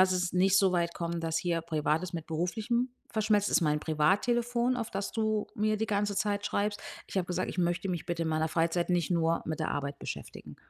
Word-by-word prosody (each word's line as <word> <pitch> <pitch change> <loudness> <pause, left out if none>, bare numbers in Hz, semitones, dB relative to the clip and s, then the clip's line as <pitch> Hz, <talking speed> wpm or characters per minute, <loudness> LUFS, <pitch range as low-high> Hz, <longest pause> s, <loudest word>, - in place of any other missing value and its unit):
lass 185 0 +5
es 180 -1 0
nicht 190 +2 +5
so 195 -2 +4
weit 170 -1 +1
kommen, 170 0 -3
dass 165 -1 0
hier 170 -1 0
Privates 160 +2 0
mit 165 -2 -5
Beruflichem 215 +10 -1 0.2
verschmelzt. 210 -2 +2
Ist - - +4
mein 150 -2 +2
Privattelefon, 235 +11 +2
auf 230 -3 -3
das 195 0 -3
du 215 -1 0
mir 215 +1 +1
die 220 +1 -1
ganze 205 -1 0
Zeit 205 -1 0
schreibst.“ 205 0 -1 0.3
Ich - - -8
habe 180 - -1
gesagt: 180 +1 -1
„Ich - - -8
möchte 175 +2 0
mich 175 -3 -3
bitte 170 -1 -1
in 160 - -1
meiner 160 0 +1
Freizeit 165 +2 +1
nicht 175 -1 +1
nur 165 -1 +2
mit 155 -1 -3
der - - -1
Arbeit 140 0 -3
beschäftigen.“ - - -7
180 Hz, 220 wpm, -30 LUFS, 165-205 Hz, 0.3 s, lass